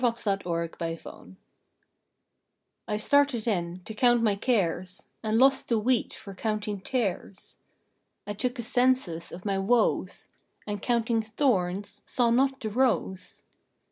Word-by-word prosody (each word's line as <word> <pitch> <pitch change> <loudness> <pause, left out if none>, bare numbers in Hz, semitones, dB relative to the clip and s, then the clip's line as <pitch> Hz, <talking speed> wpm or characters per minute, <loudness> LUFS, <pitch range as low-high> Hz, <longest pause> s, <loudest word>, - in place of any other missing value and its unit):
THE 250 - +4
ACCOUNTING 170 - -3 1.5
T 210 - -1
STARTED 275 0 +2
in 175 -4 -1
to 220 - -6
count 240 +1 +3
my 210 -3 +3
cares, 185 -5 -1 0.2
And 220 0 0
lost 270 +2 +4
the 230 - +3
wheat 240 +3 +1
for 200 - -9
counting 210 0 -2
tares. 200 -4 -3 0.7
I 205 - -4
took 245 +5 -2
a 240 - -4
census 245 -8 +1
of 180 +3 -9
my 195 -2 0
woes, 230 +5 +1 0.4
And, 205 -1 -4
counting 235 -1 +1
thorns, 205 -5 -1
saw 240 -2 +2
not 270 +2 +2
the 220 - -2
rose. 215 -5 -1
215 Hz, 130 wpm, -27 LUFS, 195-245 Hz, 1.5 s, THE